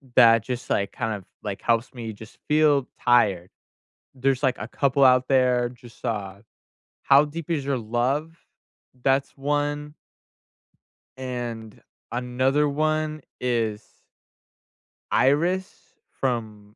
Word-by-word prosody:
that 115 -2 +7
just, 125 0 -5
like, 100 -1 0
kind 115 0 -2
of, 100 -3 -10 0.2
like, 100 -2 -5
helps 115 +1 0
me 115 -3 -6
just 110 +1 -13
feel 150 -3 +3
tired. 100 -7 +3 0.7
There's, 135 +1 0
like, 130 -2 +2
a 105 - -5
couple 140 +2 +1
out 130 0 +5
there, 125 -2 +3
just, 120 -1 -16
uh, 100 -4 -3 0.6
"How 140 +2 +6
Deep 155 +2 -7
Is 150 -5 -1
Your 140 -1 0
Love?" 130 +8 -1 0.6
That's 135 +1 +1
1 145 +1 -2 1.2
and 120 -4 -6 0.3
another 130 +4 +1
1 155 +1 -1 0.2
is 115 -4 -1 1.3
Iris 175 +8 +1 0.3
from 110 -5 -3
125 Hz, 115 wpm, -24 LUFS, 115-145 Hz, 1.3 s, that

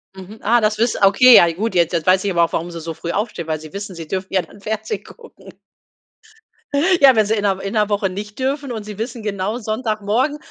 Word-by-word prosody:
Mhm. 190 +3 -11
Ah, 235 +3 +3
das 215 -1 0
wiss 230 +1 +1
ah, 195 - +4
okay 240 +5 +7
ja 170 - +7
gut 200 +3 -3
jetzt 170 0 +2
jetzt 165 -1 -2
weiß 185 +1 +4
ich 200 - -1
aber 170 -2 +3
auch, 165 - 0
warum 170 +2 -3
sie 170 -1 -7
so 165 0 -6
früh 170 - -5
aufstehen, 200 -5 -3
weil 155 -1 -2
sie 155 0 -12
wissen, 200 -1 -6
sie 165 -2 -8
dürfen 190 +3 -5
ja 190 - +3
dann 175 +4 -16
Fernsehen 220 +1 -4
gucken. 465 -1 -15 1.5
Ja, 270 -2 +7
wenn 215 -1 +3
sie 215 +2 0
in 210 - -1
'ner 195 -2 0
in 195 - -5
'ner 210 -2 +2
Woche 205 -1 0
nicht 210 +4 -8
dürfen 275 +1 -2
und 220 -2 -5
sie 210 -1 -9
wissen 230 +1 -5
genau 205 +1 -2
Sonntagmorgen, 220 +4 -1
205 Hz, 245 wpm, -19 LUFS, 185-220 Hz, 1.5 s, okay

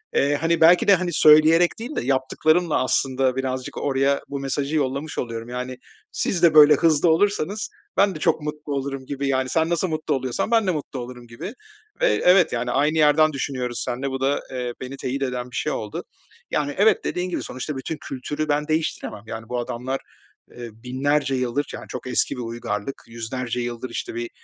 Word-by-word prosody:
Eee, 145 +1 +3
hani, 165 0 +1
belki 170 +2 +6
de, 200 - +8
hani, 185 0 -2
söyleyerek 155 +4 +6
değil 245 +7 -6
de - - 0
yaptıklarımla, 150 +4 +2
aslında, 130 0 +1
birazcık 130 -1 -3
oraya 140 0 +1
bu 140 0 -4
mesajı 140 +2 -2
yollamış 140 0 -1
oluyorum. 120 +2 -4 0.4
"Siz 175 -3 -1
de 165 - +6
böyle 150 -1 +9
hızlı 165 0 +3
olursanız 200 +3 +1 0.3
ben 195 -1 +3
de - - -6
çok 150 - +1
mutlu 150 -1 -5
olurum." 135 -1 -3
gibi, 140 0 -3
yani, 130 -1 0
"Sen 160 +4 +1
nasıl 170 +2 +1
mutlu 155 -2 -2
oluyorsan 130 - -2
ben 225 -3 +3
de - - +3
mutlu 145 -4 -5
olurum." 125 0 -8
gibi 160 - -7 0.5
ve - - +5 0.2
evet, 180 -1 +5
yani, 120 0 -1
aynı 150 +5 +2
yerden 155 0 +5
düşünüyoruz 130 -3 -3
seninle, 130 +3 -2
bu 135 0 -4
da, 135 +2 +1
eee, 125 -2 -3
beni 130 +2 -6
teyit 135 +1 -3
eden 125 -1 -3
bir - - -9
şey - - -1
oldu. 105 -1 -4 0.5
Yani, 145 -1 0
evet, 210 +3 +4
dediğin 180 +1 -2
gibi 180 - -3
sonuçta 130 +4 -5
bütün 150 +4 -4
kültürü 145 +3 -4
ben 150 +1 +1
değiştiremem. 155 -9 -2
Yani, 110 0 -7
bu 125 - -1
adamlar, 125 +2 -3 0.5
ııı, 120 -1 -8
1000'lerce 135 +2 0
yıldır, 130 +3 -1
yani, - - -7
çok 125 - -6
eski 125 - +1
bir - - -4
uygarlık 115 0 -4
100'lerce 115 +1 -4
yıldır, 120 +1 -4
işte, 115 - -5
bir 120 0 -4
140 Hz, 190 wpm, -23 LUFS, 125-155 Hz, 0.5 s, böyle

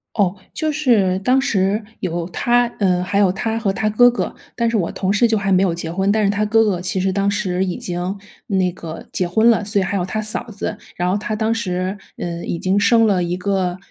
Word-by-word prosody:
哦， 200 -3 +2 0.2
就 310 -1 -1
是 220 -11 +2
当 255 +7 +3
时 205 -4 +1 0.2
有 170 -1 -3
她 240 +6 +2
呃， 180 -2 +2
还 200 +2 0
有 190 -3 +4
她 225 +4 -2
和 200 -4 0
她 215 +2 -1
哥 245 +3 +6
哥， 240 - -3 0.2
但 235 -1 +1
是 230 - -1
我 180 -6 0
同 195 +1 -1
事 235 +3 +4
就 220 -1 +1
还 195 -1 -1
没 185 0 +4
有 185 -4 +2
结 165 -1 -5
婚， 190 +3 +1
但 215 0 +2
是 200 - +3
她 205 +1 0
哥 225 +1 +3
哥 185 -4 0
其 185 +1 -2
实 190 +1 +1
当 200 0 +1
时 190 -2 -1
已 180 -2 -2
经 180 +2 -4 0.3
那 185 -3 +1
个 165 -2 -8
结 180 - 0
婚 220 +6 +4
了， 210 - +1
所 205 0 0
以 - - +1
还 195 +1 -2
有 180 - 0
她 215 +4 -3
嫂 215 +2 -3
子， 205 0 -4 0.2
然 180 +1 0
后 190 - +1
他 215 +1 -3
当 220 +1 0
时 185 -3 -2 0.2
呃， 170 -1 -4
已 170 - -3
经 190 +4 +1
生 225 +2 +4
了 190 -4 +2
一 175 +1 -2
个 185 -2 -1
195 Hz, 265 characters per minute, -20 LUFS, 180-215 Hz, 0.3 s, 哥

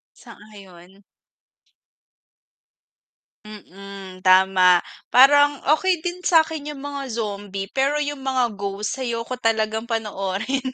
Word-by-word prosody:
Sang-ayon. 195 -2 -16 2.4
Mm, 195 -2 -11
tama 185 -1 +4 0.2
parang 285 +2 +5
okey 355 0 0
din 355 +1 -4
sakin 320 -4 +1
yung 285 -2 -8
mga 285 -1 -5
zombie 205 -3 -5
pero 275 +2 +1
yung 290 -1 -3
mga 260 -4 0
ghost, 205 +6 -4
ayoko 235 0 -4
talagang 220 +1 -1
panoorin. 215 +3 -3
225 Hz, 95 wpm, -22 LUFS, 195-280 Hz, 2.4 s, parang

